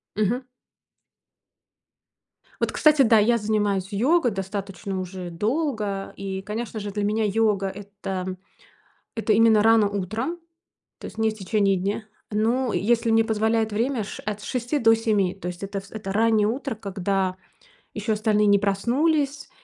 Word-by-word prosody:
Мгм. 230 +5 0 2.2
Вот, - - +1
кстати 305 -2 +4
да, 225 -3 +6
я 235 +3 +3
занимаюсь 205 -3 0
йогой 250 - +2
достаточно 195 0 -4
уже 185 -1 -6
долго. 210 - -2
И, 190 -1 -5
конечно 215 +2 -5
же, 205 0 -5
для 205 +1 -2
меня 215 +2 +1
йога- 210 -2 +1
это 195 -2 -5 0.8
это 225 -1 0
именно 220 -1 +5
рано 225 -2 +5
утром, 215 - -3 0.6
то - - -9
есть - - -9
не 220 0 +2
в - - -7
течение 200 -1 +1
дня. 200 +4 -2 0.3
Ну, 230 +4 +1
если 230 +2 +1
мне 225 0 +5
позволяет 220 0 +1
время 235 +2 0
с 195 - -8
ш - - -8
от 210 0 -4
6 245 +6 -2
до 225 -1 +5
7. 210 -5 +1
То 190 -2 -7
есть 180 +1 -6
это 195 0 -3
вс 195 - -17
это 210 -3 -5
раннее 220 0 +3
утро, 255 +2 -3
когда 195 -2 -1 0.6
еще 220 - -1
остальные 210 -1 +2
не 200 -1 +5
проснулись. 275 +9 0
210 Hz, 155 wpm, -24 LUFS, 195-225 Hz, 2.2 s, да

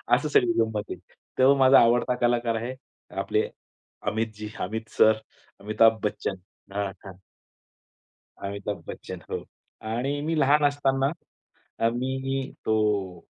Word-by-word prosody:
असं 145 +4 -1
सगळी 120 -4 +4
गंमत 110 -2 0
आहे. - - -4 0.4
तेव्हा 130 +2 +6
माझा 135 0 +7
आवडता 120 +1 +3
कलाकार 120 -1 +2
आहे, 120 +3 -3 0.5
आपले - - 0 0.6
अमितजी, 105 0 -2
अमित 110 +4 -4
सर, 110 0 +6 0.4
अमिताभ 110 +2 +3
बच्चन. 105 -2 -2 0.4
हां, 100 -1 -1
हां. 95 -2 -10 1.2
अमिताभ 100 +1 -5
बच्चन. - - -7
हो. - - -3 0.4
आणि 125 +6 -2
मी 160 +2 -1
लहान 145 +1 +4
असताना, 135 -2 +2 0.7
अ, 115 - +3
मी, 130 +2 -2
तो 105 -5 +1
115 Hz, 120 wpm, -26 LUFS, 105-135 Hz, 1.2 s, माझा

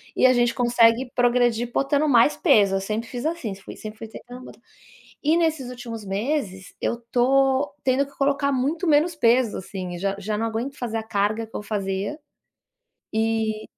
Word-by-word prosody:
e - - +3
a 255 - +5
gente 240 -1 +2
consegue 240 0 +3
progredir 240 -1 +2
botando 285 +2 +1
mais 280 +2 +5
peso, 210 - +4
eu 195 - 0
sempre 215 +3 -3
fiz 245 +1 -5
assim, 310 - -3
fui 195 - -11
sempre 215 +1 -8
treinar 245 +2 -11
bota - - -13 0.6
e 315 +3 +3
nesses 315 -6 0
últimos 235 -4 -7
meses 195 -2 -3
eu 235 - -1
tô 270 +3 +2
tendo 265 +2 +2
que 280 - -19
colocar 280 0 +1
muito 280 +7 -1
menos 315 +3 +3
peso, 235 -4 +2
assim, 185 -2 -6
já 195 +1 -1
já 210 +1 -3
não 225 - -1
aguento 235 +5 -4
fazer 230 -2 -3
a 220 - -3
carga 215 +1 -1
que 225 - -16
eu - - -4
fazia 200 +6 -3 0.9
e 220 -1 0
240 Hz, 175 wpm, -23 LUFS, 215-275 Hz, 0.9 s, a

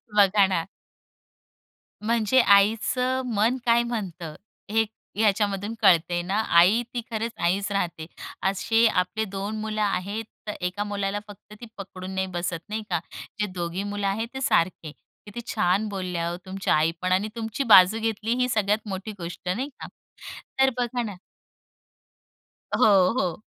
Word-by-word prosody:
बघा 200 0 +5
ना. 170 -4 -1 1.4
म्हणजे 230 +3 +2
आईचं 225 +5 +3
मन 225 +5 +2
काय 235 0 +4
म्हणतं, 180 -9 -5 0.4
हे 225 +1 +3 0.3
ह्याच्यामधून 205 -1 +1
कळतंय 175 -3 +4
ना? 190 +4 -1
आई 180 +7 +5
ती 240 - -2
खरंच 225 +1 -2
आईच 195 +4 +1
राहते. 175 -5 -2 0.4
असे 195 +4 +2
आपले 215 +2 0
2 200 +2 -4
मुलं 215 0 -3
आहेत. 205 +1 -1 0.2
तर 210 - -2
एका 180 +3 -2
मुलाला 205 0 -2
फक्त 205 0 -14
ती - - -7
पकडून 185 -1 -8
नाही 190 0 0
बसत, 175 -2 -3
नाही 215 +1 -3
का. 175 - +1 0.4
जे 210 - +2
दोघी 175 +2 -3
मुलं 205 0 -2
आहेत, 215 +4 -1
ते 265 - -5
सारखे. 170 - +1 0.3
किती 210 +3 -8
छान 185 +5 +1
बोलल्या 180 -4 -3
हो 175 - -4
तुमच्या 190 0 -1
आईपण 165 +4 0
आणि 190 +3 +2
तुमची 230 +3 -3
बाजू 210 -2 +7
घेतली, 225 0 -1
ही 250 0 +1
सगळ्यात 215 -1 0
मोठी 195 +2 -5
गोष्ट 175 +1 -6
नाही 265 +6 -3
का. - - -7 0.7
तर 265 0 +6
बघा 245 0 -1
ना 210 -3 -5 1.6
हो, 195 -4 +5
हो. 180 -3 -2
205 Hz, 150 wpm, -25 LUFS, 185-220 Hz, 1.6 s, बाजू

